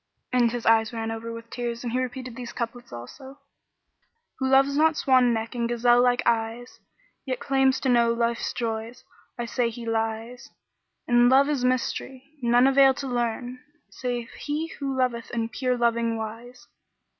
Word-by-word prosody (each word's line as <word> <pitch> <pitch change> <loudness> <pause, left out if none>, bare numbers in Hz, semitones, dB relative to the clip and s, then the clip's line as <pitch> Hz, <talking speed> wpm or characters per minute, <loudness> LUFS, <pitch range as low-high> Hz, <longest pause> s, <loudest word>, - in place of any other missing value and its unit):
And 245 -2 +4
his 240 -1 -5
eyes 225 -1 +4
ran 225 -1 -4
over 225 +1 -5
with 230 0 -9
tears 240 -1 -4
and 240 -1 -4
he 255 - +1
repeated 255 -1 -5
these 245 -2 -7
couplets 240 0 -5
also, 265 - -10 1.0
"Who 265 - 0
loves 270 +1 +4
not 315 +1 +3
swan 255 -2 +4
neck 225 +1 -2
and 235 -1 -2
gazelle 240 0 +4
like 245 0 +2
eyes, 230 +1 -1 0.2
* - - -39
Yet 255 -1 -2
claims 270 -1 +2
to 265 - 0
know 235 -1 +4
Life's 235 0 -1
joys, 230 0 -4 0.3
I 240 - -3
say 235 0 0
he 235 +1 -8
lies: 225 +2 -3 0.6
In 240 0 +5
Love 270 +2 +5
is 280 -4 -1
mystery, 260 +2 -2
none 240 +1 +4
avail 270 0 +5
to 275 - -5
learn 245 0 -2 0.2
* - - -45
Save 245 -2 -3
he 305 +2 -4
who 275 -2 -3
loveth 245 -3 -1
in 230 -1 -2
pure 250 +1 -1
loving 235 -1 +1
wise. 230 +3 -8
245 Hz, 175 wpm, -25 LUFS, 230-255 Hz, 1.0 s, In